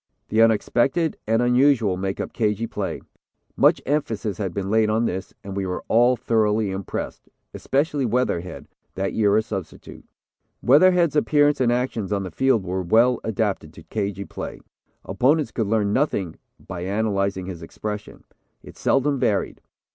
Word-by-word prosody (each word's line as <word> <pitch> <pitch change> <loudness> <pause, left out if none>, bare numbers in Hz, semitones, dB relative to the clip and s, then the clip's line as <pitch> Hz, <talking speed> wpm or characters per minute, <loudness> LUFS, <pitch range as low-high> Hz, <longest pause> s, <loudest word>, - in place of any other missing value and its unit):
The 110 +1 +3
unexpected 120 +8 +2
and 115 +2 +2
unusual 125 -5 +3
make 95 +1 -3
up - - -4
'cagey' 110 0 0
play. - - -4 0.5
Much - - +4
emphasis 115 - -2
had 95 -3 -2
been 95 +2 -3
laid 110 -1 +3
on 110 +2 +1
this, 95 -3 -3
and 100 -1 -7
we 100 -1 -2
were 90 - -4
all 120 +2 +4
thoroughly 110 -3 +1
impressed, 95 0 -5 0.2
especially 145 +1 0
Weatherhead, 110 -7 -2 0.3
that 95 +1 -2
year 105 -1 +3
a 110 - +2
substitute. 100 -6 -8 0.6
"Weatherhead's 170 +3 +5
appearance 145 -1 +3
and 120 -2 +3
actions 120 -5 -2
on 100 -1 0
the 95 - -6
field 130 +2 +2
were 95 +1 -2
well 115 +7 +3
adapted 105 -8 -2
to 80 - -13
cagey 100 -1 -3
play. - - -7 0.5
Opponents 145 +3 +1
could 110 -4 -2
learn 105 -1 +1
nothing 100 - -1 0.2
by 85 - -8
analyzing 100 -1 -1
his 90 -2 -7
expression. 105 +5 -7 0.4
It - - -13
seldom 140 0 +1
varied. 100 -4 0
110 Hz, 155 wpm, -23 LUFS, 100-125 Hz, 0.6 s, Weatherhead's